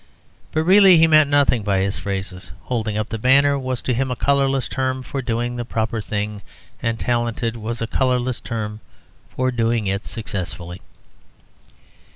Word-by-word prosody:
But 155 - 0
really 190 0 +7
he 160 - +6
meant 155 -2 +5
nothing 145 -5 +3
by 100 -1 0
his 95 +1 -1
phrases. 95 -2 -5
"Holding 110 -4 -2
up 110 0 -2
the 115 - -4
banner" 140 +4 +4
was 130 -1 -3
to 130 - 0
him 130 +2 -1
a 125 - -2
colourless 135 0 +1
term 130 -1 -2
for 135 +1 -4
doing 120 0 -2
the 120 - -2
proper 110 -1 -2
thing, 105 0 -4 0.4
and 115 -1 -1
"talented" 120 -1 -1
was 115 +1 -4
a - - 0
colourless 125 +1 0
term 105 -2 -5 0.5
for 130 0 -1
doing 115 -2 0
it 100 +1 -2
successfully. 90 -5 -5
120 Hz, 165 wpm, -21 LUFS, 110-130 Hz, 0.5 s, really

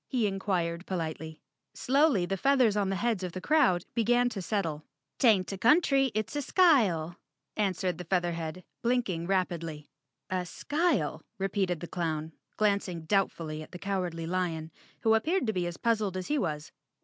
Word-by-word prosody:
he 245 -5 0
inquired 185 -3 -1
politely. 160 -3 -4 0.4
Slowly 270 - +3
the 195 - -1
feathers 255 0 +3
on 200 -2 +1
the 195 - 0
heads 225 0 0
of 180 -2 -4
the 185 - -4
crowd 245 - +3
began 240 +1 +3
to 210 -5 -5
settle. 165 -6 -2 0.4
"'Taint 210 -8 +4
a 195 - -6
country, 270 - +4
it's 215 +5 -2
a 290 - 0
skyle," 215 - +3 0.4
answered 185 -4 -1
the 180 - -6
Feath 180 +1 +1
erhead, 170 +1 -4 0.2
blinking 230 -9 0
rapidly. 170 -5 -1 0.5
"A 185 -1 0
skyle?" 290 - 0 0.2
repeated 190 -3 -1
the 175 - -5
clown, 160 -3 -3 0.3
glancing 200 -5 +1
doubtfully 165 -5 0
at 155 - -12
the - - -5
Cowardly 180 -3 -3
Lion, 165 -2 -2 0.3
who 220 - +4
appeared 310 +10 +1
to 220 - 0
be 180 -2 -1
as 175 - -6
puzzled 215 -5 0
as 185 - -5
he 295 - +1
was. 150 - -3
190 Hz, 165 wpm, -29 LUFS, 170-225 Hz, 0.5 s, Taint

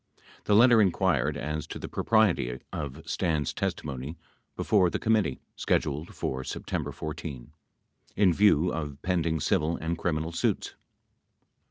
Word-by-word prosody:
87 - - -29
The 105 - +3
letter 120 0 +7
inquired 85 - +2
as 75 +1 -3
to - - -6
the - - -6
propriety 100 - +2
of 75 +1 -6
Stans' 80 -6 0
testimony 70 +3 -4 0.4
before 95 -5 +3
the - - -2
committee, 110 -11 +1 0.2
scheduled 75 +3 -1
for 65 0 -3
September - - -4
14, 75 -4 -7 0.6
in 95 -4 +4
view 90 -3 +4
of 75 -3 -4
pending 85 -3 0
civil 80 +4 +1
and 80 +1 -3
criminal 80 -1 -1
suits. 85 - -1
80 Hz, 135 wpm, -28 LUFS, 75-90 Hz, 0.6 s, letter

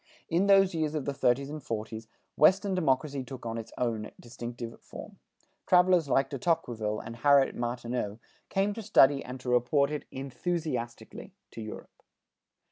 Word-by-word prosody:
In 175 +4 +2
these 195 -2 +5
years 155 -2 -1
of 150 - -2
the 140 - -1
thirties 135 +1 +1
and 155 0 -6
forties, 110 -1 -5 0.3
Western 190 +5 +4
democracy 140 -4 0
took 130 -1 -9
on 115 0 -3
its 115 - -9 0.5
distinctive 120 0 -8
form. - - -11 0.5
Travelers 180 -4 +4
like 135 0 +2
De 140 - -4
Tocqueville 120 -10 -1
and 115 +1 -8
Harriet 140 +1 +4
Martineau, 120 -3 -3 0.3
came 195 +2 +1
to 225 - -6
study 145 -10 +4
and 130 +1 -7
to 125 - -5
report 140 +4 +2
it 150 - -4
enthusiastically 135 -2 -4 0.2
to 115 - -8
Europe. 110 -1 -9
135 Hz, 150 wpm, -29 LUFS, 120-160 Hz, 0.5 s, these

